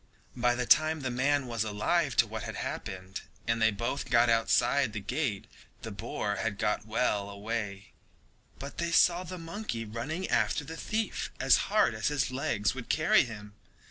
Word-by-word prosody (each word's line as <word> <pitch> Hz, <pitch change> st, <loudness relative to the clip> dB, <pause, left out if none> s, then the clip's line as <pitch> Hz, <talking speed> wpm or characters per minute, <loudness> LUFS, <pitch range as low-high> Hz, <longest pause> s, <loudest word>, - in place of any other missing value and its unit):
By 120 Hz, -1 st, +2 dB
the 125 Hz, 0 st, -1 dB
time 155 Hz, +3 st, +4 dB
that -, -, -9 dB
the -, -, -5 dB
man 140 Hz, +2 st, +2 dB
was 115 Hz, -3 st, -1 dB
alive 115 Hz, +7 st, 0 dB
to -, -, +5 dB
what -, -, -6 dB
had -, -, -6 dB
happened, 95 Hz, 0 st, -5 dB, 0.2 s
and 115 Hz, 0 st, 0 dB
they 110 Hz, -, +6 dB
both 115 Hz, +6 st, -3 dB
got 120 Hz, -1 st, +5 dB
outside 115 Hz, +2 st, +2 dB
the 105 Hz, -, -3 dB
gate, 120 Hz, 0 st, -2 dB, 0.4 s
the 110 Hz, -, -5 dB
boar 105 Hz, -1 st, -3 dB
had 115 Hz, -3 st, -2 dB
got 105 Hz, +1 st, -1 dB
well 105 Hz, -3 st, 0 dB
away, 100 Hz, -1 st, -5 dB, 0.7 s
but 140 Hz, +1 st, -8 dB
they 170 Hz, 0 st, -1 dB
saw 175 Hz, +1 st, +4 dB
the 185 Hz, +1 st, -7 dB
monkey 165 Hz, -, -5 dB
running 130 Hz, -, -4 dB
after 115 Hz, +4 st, +1 dB
the 160 Hz, +3 st, -7 dB
thief 215 Hz, +4 st, -2 dB
as -, -, +5 dB
hard -, -, +3 dB
as 110 Hz, -1 st, -1 dB
his 145 Hz, -3 st, 0 dB
legs 110 Hz, -5 st, 0 dB
would 125 Hz, -2 st, -8 dB
carry 155 Hz, -2 st, +4 dB
him. 105 Hz, -3 st, -9 dB
120 Hz, 180 wpm, -30 LUFS, 105-145 Hz, 0.7 s, they